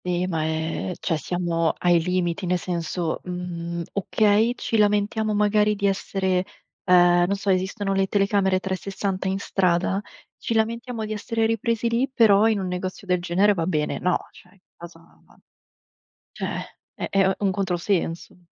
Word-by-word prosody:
Ehm, 180 0 -1
ma 160 -3 -1
è 160 +3 -2
cioè 165 - -1
siamo 165 +1 -1
ai 175 -1 +3
limiti, 180 +1 -1
nel 180 +1 +2
senso, 170 -1 -3
mhmm, 170 -1 -5
okay, 210 +3 +2
ci 225 - -2
lamentiamo 210 +1 +1
magari 210 0 +3
di 200 0 -2
essere 190 -1 0 0.4
ehm, 175 -1 +5
non 200 - 0
so, 200 0 -1
esistono 195 +2 -1
le 195 0 +1
telecamere 195 -1 +2
360 190 0 -3
in 190 0 0
strada, 190 0 0 0.4
ci 230 - -2
lamentiamo 230 +1 -1
di 215 - -4
essere 225 +1 -1
ripresi 225 +1 0
lì, 235 +4 +1
però 220 -4 +5
in 220 -2 +1
un 190 - -3
negozio 185 +2 -5
del 180 -2 +1
genere 185 +4 +3
va 170 -4 -2
bene. 150 -4 -1
No, 180 0 +2
cioè, 180 - -18
in 195 - -25 0.2
casa 170 -1 -12 1.3
cioè - - -4 0.3
è - - -5
è 195 -1 +3
u 190 - +2
un 195 - +3
controsenso. 180 -2 -2
190 Hz, 160 wpm, -24 LUFS, 175-205 Hz, 1.3 s, ehm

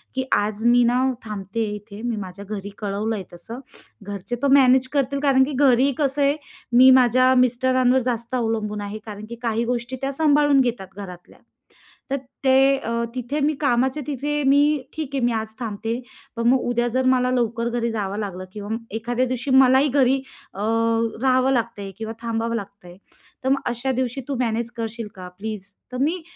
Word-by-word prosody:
की 260 - 0
"आज 210 +2 0
मी 240 0 +5
ना 245 +2 +2 0.2
थांबते 210 +1 -4
आहे 210 - -4
इथे. 210 0 -10
मी 235 -1 -2
माझ्या 195 0 -7
घरी 205 -1 -6
कळवलं 210 +2 -2
आहे 195 - -5
तसं. 225 +8 -9 0.4
घरचे 200 +3 -5
तर - - +4
मॅनेज 260 -1 +5
करतील, 280 0 0
कारण 265 -2 +5
की 285 - -2
घरी 265 0 +4
कसं 285 -1 0
आहे, 280 +1 +3 0.4
मी 255 +2 +8
माझ्या 255 +2 +4
मिस्टरांवर 255 +1 +3
जास्त 235 +1 -3
अवलंबून 220 -3 -1
आहे. 205 +1 -5
कारण 210 -1 -8
की 235 - -6
काही 230 0 0
गोष्टी 245 +1 -2
त्या 275 0 -1
सांभाळून 290 -2 +4
घेतात 235 -6 -2
घरातल्या. 180 -3 -10 0.7
तर 275 - +1 0.3
ते 265 - +5 0.3
अ, 230 - -5 0.2
तिथे 255 +4 -3
मी 300 +2 +2
कामाच्या 265 +2 +1
तिथे 295 +1 -2
मी 285 +1 +4
ठीक 310 -4 -4
आहे, 260 - 0
मी 240 - +2
आज 220 0 -2
थांबते. 225 +1 -3 0.3
पण 230 0 0
मग 255 +1 +5
उद्या 240 0 +1
जर 255 +2 0
मला 255 -1 +3
लवकर 235 -1 0
घरी 235 0 -1
जावं 205 -2 -3
लागलं 190 -3 -5
किंवा 205 -1 -7 0.3
एखाद्या 240 +3 -1
दिवशी 255 +2 -3
मलाही 265 +2 +6
घरी 265 -1 +3 0.4
अ, 195 - -10 0.6
राहावं 260 0 +3
लागतं 230 -4 -1
आहे 195 - -6
किंवा 220 0 -5
थांबावं 230 0 -2
लागतं 200 -3 -7
आहे, 175 - -13 0.5
तर 265 - 0
मग 275 0 +3
अशा 245 +2 -1
दिवशी 260 +1 -2
तू 280 - -2
मॅनेज 235 0 -1
करशील 230 0 -4
का 180 -1 -8
प्लीज?" 215 -1 -5 0.3
तर 250 - -5
मी 325 +5 0
240 Hz, 185 wpm, -22 LUFS, 215-260 Hz, 0.7 s, मी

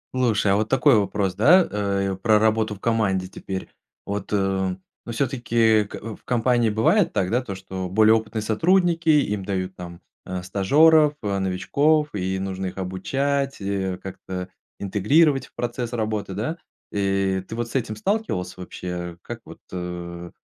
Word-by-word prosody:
Слушай, 110 -6 +2
а - - +3
вот 110 +1 0
такой 135 0 +5
вопрос, 100 -2 0
да, 165 - +6
э, 100 -1 -1
про 105 +3 +3
работу 110 0 +1
в - - -16
команде 100 -5 0
теперь. 95 0 -6 0.4
Вот, 100 -1 -4
э, - - +2
ну 95 +3 -3
всё-таки 115 -3 +2
к - - -9 0.2
в - - -23
компании 120 -1 +2
бывает 115 - +3
так, 90 -2 0
да, 120 +5 +1
то 100 -7 -6
что 95 -1 -6
более 110 +3 +5
опытные 110 0 -2
сотрудники, 170 - +2
им 105 -10 +3
дают 95 -1 -3
там, 85 -1 -9 0.2
э, 90 -1 -4
стажеров, 150 - +4
э, 100 -1 -1
новичков, 145 +12 +1
и 95 -1 -1
нужно 95 0 -3
их 90 - -7
обучать, 135 +10 -1
э, 95 -2 -2
как-то 90 -1 -6 0.3
интегрировать 135 - +2
в - - -30
процесс 120 -1 -3
работы, 110 -3 -2
да. 120 - -3 0.3
И 95 -1 0
ты 115 - -6
вот 120 0 -3
с - - -11
этим 115 -5 -1
сталкивался 190 - -2
вообще? 90 -1 -6
Как - - -7
вот, - - -12
э, 85 -1 -6
105 Hz, 160 wpm, -23 LUFS, 95-120 Hz, 0.4 s, да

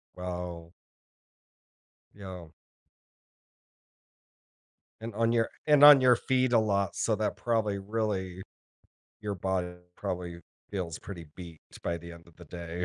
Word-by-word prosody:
Wow. 90 -2 -6 1.4
Yeah. 95 -4 -8 2.5
And 115 -1 -6
on 115 +1 +2
your 115 -1 +2 0.2
and 150 -1 +6
on 145 -2 +11
your 125 -1 +6
feet 130 +1 +1
a 115 - +6
lot, 100 -2 0
so 110 - +1
that 105 0 -1
probably 110 -4 0
really 100 -3 -2 0.8
your 105 -2 -3
body 90 -1 -2 0.2
probably 90 -3 -4 0.3
feels 90 -5 -4
pretty 85 -5 -9
beat 85 -4 -10 0.2
by 85 0 -2
the 85 +1 -10
end 85 0 -14
of 85 - -21
the 85 - -12
day. 85 +1 -5
95 Hz, 125 wpm, -29 LUFS, 85-110 Hz, 2.5 s, on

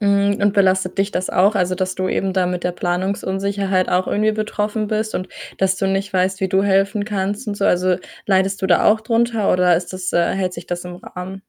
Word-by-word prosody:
hm, 200 0 +2
und 205 - +3
belastet 190 -1 +2
dich 195 +1 +1
das 185 - -2
auch? 200 +4 +3
Also, 185 -1 +1
dass 185 0 -2
du 185 0 -2
eben 195 -1 -1
da 185 -1 +1
mit 180 -1 -3
der 180 - 0
Planungsunsicherheit 190 +1 -1
auch 180 +1 +1
irgendwie 215 +1 +1
betroffen 215 0 -2
bist 215 0 -2
und 185 - -3 0.3
dass 190 -1 +2
du 195 - -1
nicht 195 +1 -1
weißt, 185 +1 0
wie 190 - 0
du 190 +1 +2
helfen 200 +1 +1
kannst 205 +3 -3
und 205 - -3
so? 200 - -1
Also, 180 0 +2 0.3
leidest 195 0 +1
du - - +2
da 175 -2 +3
auch 215 +1 +4
drunter 230 -1 +1
oder 180 -2 +4
ist 175 +2 -4
das 185 -1 -4
äh, 170 0 +2
hält 185 -2 -1
sich 170 0 -9
das 175 0 -4
im 175 0 -7
Rahmen? 180 +1 -8
190 Hz, 230 wpm, -20 LUFS, 185-205 Hz, 0.3 s, auch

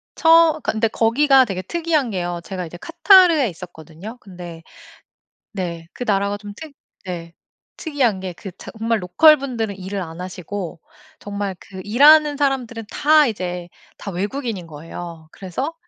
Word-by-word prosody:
처 325 -2 +5
근데 225 +1 +1
거기가 260 +5 +4
되게 190 -5 -4
특이한 315 - 0
게요. 175 -2 -3
제가 185 -2 -5
이제 175 - -10
카타르에 335 - +5
있었거든요? 175 +5 -10
근데 175 -4 -10 0.9
네 170 -5 -5
그 - - -5
나라가 200 0 +1
좀 205 -1 -10
특 320 -2 -10 0.3
네 170 -2 -6 0.4
특이한 260 - 0
게 185 -1 -4
그 195 - -9
차 - - -10
정말 225 -1 0
로컬 305 - +6
분들은 230 -7 -3
일을 195 +1 -5
안 165 -1 -8
하시고 185 0 -6 0.4
정말 200 -1 -4
그 190 -1 -10
일하는 290 +7 +6
사람들은 250 -6 -1
다 305 0 +4
이제 180 -5 -4 0.3
다 - - -7
외국인인 205 +1 -4
거예요. 165 +1 -9
그래서 260 - -4
205 Hz, 300 characters per minute, -21 LUFS, 180-275 Hz, 0.9 s, 로컬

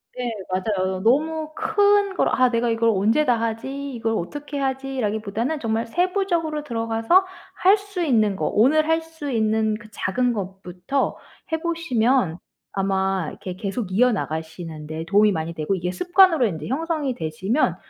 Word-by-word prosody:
네 245 -2 -3 0.2
맞아요. 185 -1 -1
너무 310 +6 +1
큰 405 -1 +2
걸 - - +2
'아 255 -1 +3
내가 235 0 0
이걸 230 0 +2
언제 220 +8 +2
다 245 -4 +2
하지? 265 +5 -3
이걸 225 -1 -1
어떻게 290 - -5
하지?'라기보다는 260 -1 -2
정말 225 -1 -1
세부적으로 345 - 0
들어가서 230 +8 +2 0.3
할 385 +3 +4
수 400 -3 -6
있는 215 - +2
거 - - -1
오늘 305 +8 +3
할 325 0 +2
수 320 -3 -7
있는 220 -2 +1
그 230 -2 -14
작은 240 +5 0
것부터 190 +5 -3 0.3
해 320 - 0
보시면 255 - +1 0.3
아마 190 -2 0
이렇게 185 -1 -7
계속 200 0 -4
이어나가시는 160 -8 -1
데 160 +1 -5
도움이 205 +3 +4
많이 160 0 -3
되고 160 +4 -1
이게 180 -1 -2
습관으로 355 - +4
인제 160 -5 -5
형성이 300 0 -1
되시면 190 - 0
230 Hz, 325 characters per minute, -23 LUFS, 195-300 Hz, 0.3 s, 할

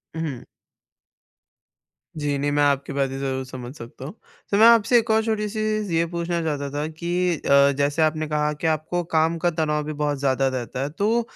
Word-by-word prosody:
हुँ। 155 -7 -4 1.7
जी, 145 -2 -1
नहीं 145 +1 -1
मैं 145 0 +2
आपकी 140 -1 +1
बातें 135 -1 -1
ज़रूर 135 -1 -2
समझ 125 -1 -8
सकता 120 0 -10
हूँ। 155 - -7 0.4
तो 200 - +3
मैं 220 +2 +8
आपसे 235 +1 +5
एक 230 0 -5
और 220 0 +3
छोटी-सी 215 -1 -2
चीज़ 215 -2 -1
ये 165 +1 +2
पूछना 170 0 -1
चाहता 145 -3 -2
था 145 +2 -2
कि 175 +2 -1
अ, 140 0 +4
जैसे 145 +2 +1
आपने 155 0 +1
कहा 150 0 0
कि 150 +2 -3
आपको 160 +3 -1
काम 160 +1 +2
का 175 +1 +1
तनाव 155 -2 -1
भी 155 +1 -5
बहुत 145 -1 -1
ज़्यादा 135 -1 +1
रहता 125 +1 -5
है 140 - -2
तो 210 +9 +1
155 Hz, 195 wpm, -23 LUFS, 140-175 Hz, 1.7 s, मैं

